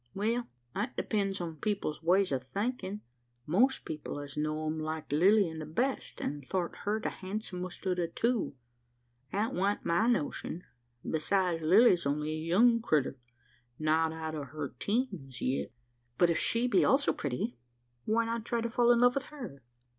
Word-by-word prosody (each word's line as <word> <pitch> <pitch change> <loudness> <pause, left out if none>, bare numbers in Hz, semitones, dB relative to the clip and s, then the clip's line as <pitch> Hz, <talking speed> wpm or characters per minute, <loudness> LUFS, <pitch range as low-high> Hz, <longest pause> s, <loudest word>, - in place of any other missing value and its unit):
"Well, 230 +4 0 0.3
that 215 +6 -2
depends 200 -3 0
upon 165 -3 -5
people's 195 -4 -2
ways 185 +2 +3
o' 135 - +1
thinkin'. 200 - -3 0.4
Most 245 - +2
people 150 -2 -5
as 145 -1 -7
know 155 +1 -1
'em 155 +1 -1
liked 155 -1 -4
Lilian 180 0 +4
the 155 - -6
best, 250 - -2
an' 145 0 -3
thort 175 +5 -2
her 210 +2 +1
the - - -2
handsumest 185 -2 -6
o' 185 - +2
the 175 -2 -1
two. 225 - 0 0.8
That 215 +5 0
wan't 200 +3 0
my 170 +7 +3
notion. 180 -5 -1 0.4
Besides, 175 +1 +1
Lilly's 180 0 +5
only 150 +2 -1
a - - -2
young 230 +7 +5
crittur 145 - +1 0.6
not 160 +1 +2
out 160 0 -5
o' 150 -2 -4
her 145 0 -6
teens 195 - -2
yit." 130 -1 -1 0.5
"But 175 -1 +5
if 160 - +1
she 235 +2 +1
be 245 - +4
also 275 +2 +4
pretty, 125 -3 -3 0.5
why 230 +2 +2
not 230 0 -2
try 235 +1 -1
to 235 0 -2
fall 240 0 +4
in 240 0 +4
love 245 0 +6
with 275 -1 -2
her? 245 - -9
180 Hz, 170 wpm, -31 LUFS, 155-225 Hz, 0.8 s, love